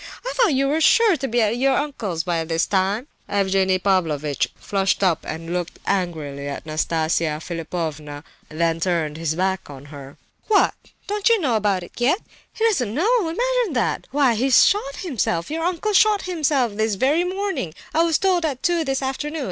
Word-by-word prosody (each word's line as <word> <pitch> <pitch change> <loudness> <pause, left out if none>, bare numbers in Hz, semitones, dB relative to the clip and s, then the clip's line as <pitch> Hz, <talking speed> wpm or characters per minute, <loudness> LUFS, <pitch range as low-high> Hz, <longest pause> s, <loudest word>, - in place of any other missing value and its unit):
I - - -2
thought 445 - +3
you 275 +1 +2
were 305 +3 0
sure 440 +3 +5
to 270 -2 -3
be 240 0 +1
at 220 +2 0
your 265 +1 +2
uncle's 220 - -2
by 170 -1 -1
this 165 +1 0
time." 200 +6 0 0.2
Evgenie 190 -1 +2
Pavlovitch 160 -7 0
flushed 195 0 -1
up 175 -4 +3
and 165 +2 -5
looked 175 -1 -3
angrily 155 -7 -2
at 140 - -6
Nastasia 155 0 0
Philipovna, 155 -3 -5 0.3
then 165 +1 0
turned 165 -3 -1
his 160 -1 -2
back 190 0 -1
on 140 -1 -10
her. 140 -1 -11 0.3
"What! 430 - +4 0.3
don't 415 +2 0
you 460 -1 +4
know 265 -10 +1
about 200 -4 +1
it - - -11
yet? 255 +9 +3 0.3
He 450 - -1
doesn't 250 - +1
know—imagine 460 - +1
that! 245 - -1
Why, 275 -3 +3
he's 255 +3 +5
shot 335 -9 0
himself. 230 - -2
Your 325 +1 -2
uncle 365 +4 -1
shot 420 +1 +4
himself 295 - 0
this 220 0 0
very 285 - +2
morning. 375 - -3 0.2
I 320 - +3
was 330 -2 +3
told 370 -3 +1
at 280 -5 -2
two 345 -2 +2
this 270 -2 -2
afternoon. 295 +4 -3
220 Hz, 180 wpm, -22 LUFS, -, 0.3 s, sure